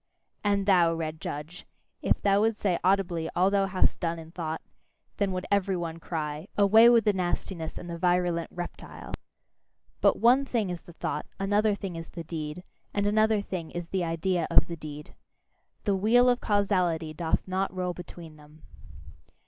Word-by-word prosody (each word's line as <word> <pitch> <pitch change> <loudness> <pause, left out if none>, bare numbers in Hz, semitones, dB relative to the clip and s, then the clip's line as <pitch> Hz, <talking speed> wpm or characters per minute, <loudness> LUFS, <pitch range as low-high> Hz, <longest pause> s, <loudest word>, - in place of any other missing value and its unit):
And 200 -1 +1
thou, 175 -4 +4
red 160 -1 -4
judge, 155 +6 -6 0.3
if - - +1
thou 200 0 +4
would 220 0 +2
say 180 -4 +1
audibly 180 -3 +1
all 185 +2 +3
thou 200 -1 +2
hast 185 -1 +1
done 170 -1 -1
in 165 0 -10
thought, 160 -2 -4 0.6
then 200 -2 +1
would 185 0 -3
every 200 -2 +2
one 165 -1 -4
cry: 155 0 -4
"Away 220 +3 +7
with 235 -2 +5
the 210 - +4
nastiness 175 -2 -3
and 175 - -7
the 170 -1 -6
virulent 175 -1 +1
reptile!" 175 0 -8 0.9
But - - +4
one 250 +4 +5
thing 225 -8 -1
is 175 - -5
the 175 - -14
thought, 150 -2 -4
another 205 +2 +2
thing 195 -3 -6
is 165 0 -8
the 170 - -7
deed, 160 +1 -5 0.3
and 205 0 +1
another 215 0 +3
thing 175 -5 -5
is 175 -1 -6
the 190 -2 -1
idea 165 +1 0
of - - +6
the 170 - -6
deed. 150 -1 -9 0.7
The 200 -3 +1
wheel 235 +6 +4
of 245 0 +1
causality 180 -6 +1
doth 160 +3 -1
not 190 +1 -1
roll 180 -1 -2
between 170 -2 -10
them. 150 +1 -18
180 Hz, 175 wpm, -28 LUFS, 165-200 Hz, 0.9 s, Away